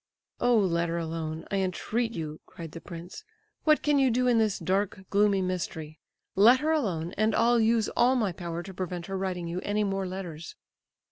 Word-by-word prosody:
"Oh, 245 Hz, -1 st, +4 dB
let 170 Hz, -4 st, +1 dB
her 170 Hz, -, -1 dB
alone, 160 Hz, -1 st, -4 dB
I 200 Hz, -, +1 dB
entreat 215 Hz, +5 st, -1 dB
you!" 155 Hz, -3 st, -5 dB
cried 165 Hz, -2 st, -9 dB
the 165 Hz, -, -9 dB
prince. 170 Hz, +1 st, -9 dB, 0.4 s
"What 305 Hz, -1 st, +4 dB
can 295 Hz, -1 st, +3 dB
you 265 Hz, -1 st, +4 dB
do 250 Hz, +2 st, +1 dB
in 240 Hz, -2 st, +4 dB
this 215 Hz, -3 st, +1 dB
dark, 195 Hz, +1 st, -1 dB
gloomy 200 Hz, -1 st, +3 dB
mystery? 160 Hz, -4 st, -4 dB, 0.4 s
Let 235 Hz, +6 st, +7 dB
her 310 Hz, +1 st, +1 dB
alone, 185 Hz, -, -1 dB
and 215 Hz, 0 st, +2 dB
I'll 235 Hz, +1 st, +4 dB
use 225 Hz, 0 st, +3 dB
all 255 Hz, +2 st, +3 dB
my 215 Hz, -6 st, +1 dB
power 170 Hz, -1 st, -5 dB
to 190 Hz, -, -9 dB
prevent 180 Hz, -1 st, -4 dB
her 195 Hz, -, -5 dB
writing 180 Hz, -3 st, -3 dB
you 170 Hz, +2 st, -3 dB
any 210 Hz, +1 st, 0 dB
more 195 Hz, -1 st, -1 dB
letters." 175 Hz, -4 st, -7 dB
190 Hz, 195 wpm, -28 LUFS, 170-225 Hz, 0.4 s, Let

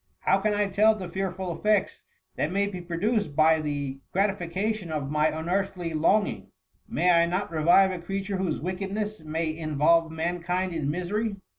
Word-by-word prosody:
How 195 Hz, -, +3 dB
can 210 Hz, +1 st, 0 dB
I 205 Hz, 0 st, +2 dB
tell 210 Hz, +3 st, +4 dB
the 190 Hz, -4 st, -6 dB
fearful 185 Hz, -1 st, -3 dB
effects 210 Hz, +2 st, 0 dB, 0.3 s
that 155 Hz, -, -1 dB
may 200 Hz, +2 st, +1 dB
be 190 Hz, -3 st, -5 dB
produced 180 Hz, +1 st, -1 dB
by 160 Hz, +1 st, +5 dB
the 145 Hz, -3 st, -3 dB
gratification 195 Hz, 0 st, -1 dB
of 145 Hz, -3 st, -3 dB
my 150 Hz, 0 st, +3 dB
unearthly 175 Hz, +1 st, -2 dB
longing? 200 Hz, +7 st, +1 dB, 0.4 s
May 180 Hz, +1 st, +2 dB
I 170 Hz, 0 st, +4 dB
not 185 Hz, +1 st, -2 dB
revive 170 Hz, +4 st, +4 dB
a 185 Hz, -, -4 dB
creature 195 Hz, +3 st, -3 dB
whose 185 Hz, -4 st, -1 dB
wickedness 195 Hz, +3 st, -3 dB
may 160 Hz, +1 st, -2 dB
in 155 Hz, -2 st, -5 dB
volve 165 Hz, +2 st, +4 dB
mankind 175 Hz, +3 st, -2 dB
in 155 Hz, -4 st, -2 dB
misery? 200 Hz, +7 st, -2 dB
180 Hz, 165 wpm, -26 LUFS, 160-195 Hz, 0.4 s, by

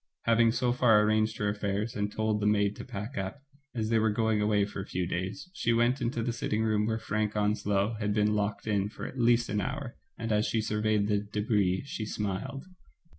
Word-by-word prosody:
Having 115 Hz, 0 st, +4 dB
so 120 Hz, 0 st, +1 dB
far 115 Hz, -4 st, +5 dB
arranged 110 Hz, +1 st, +2 dB
her 105 Hz, -, -1 dB
affairs, 100 Hz, +2 st, -2 dB
and 105 Hz, 0 st, -1 dB
told 110 Hz, -1 st, 0 dB
the 105 Hz, -, +1 dB
maid 100 Hz, -1 st, +2 dB
to -, -, -6 dB
pack 105 Hz, +6 st, -5 dB
up, 95 Hz, +9 st, -5 dB, 0.3 s
as 110 Hz, -2 st, -1 dB
they 115 Hz, -, +4 dB
were 110 Hz, 0 st, +3 dB
going 110 Hz, 0 st, +1 dB
away 105 Hz, -1 st, +2 dB
for 100 Hz, -1 st, -6 dB
a -, -, -7 dB
few 90 Hz, -1 st, -2 dB
days, 95 Hz, -, -4 dB
she 115 Hz, -, +1 dB
went 120 Hz, +3 st, +2 dB
into 120 Hz, -1 st, -1 dB
the 120 Hz, -, -1 dB
sitting 110 Hz, -1 st, -1 dB
room 105 Hz, -1 st, +1 dB
where 110 Hz, 0 st, 0 dB
Frank 105 Hz, -1 st, -2 dB
Onslow 105 Hz, 0 st, +1 dB
had 105 Hz, -1 st, 0 dB
been 105 Hz, 0 st, +2 dB
locked 105 Hz, 0 st, -1 dB
in 100 Hz, -2 st, 0 dB
for -, -, -8 dB
at 130 Hz, -, -7 dB
least 120 Hz, 0 st, +4 dB
an 105 Hz, -1 st, -1 dB
hour, 135 Hz, -1 st, -4 dB, 0.2 s
and, 115 Hz, 0 st, -3 dB
as 105 Hz, 0 st, +2 dB
she 115 Hz, -, 0 dB
surveyed 105 Hz, -1 st, +1 dB
the 105 Hz, -1 st, +2 dB
d^bris^ 105 Hz, -2 st, 0 dB
she 110 Hz, -6 st, -5 dB
smiled. 105 Hz, -, -3 dB
105 Hz, 220 wpm, -29 LUFS, 105-115 Hz, 0.3 s, far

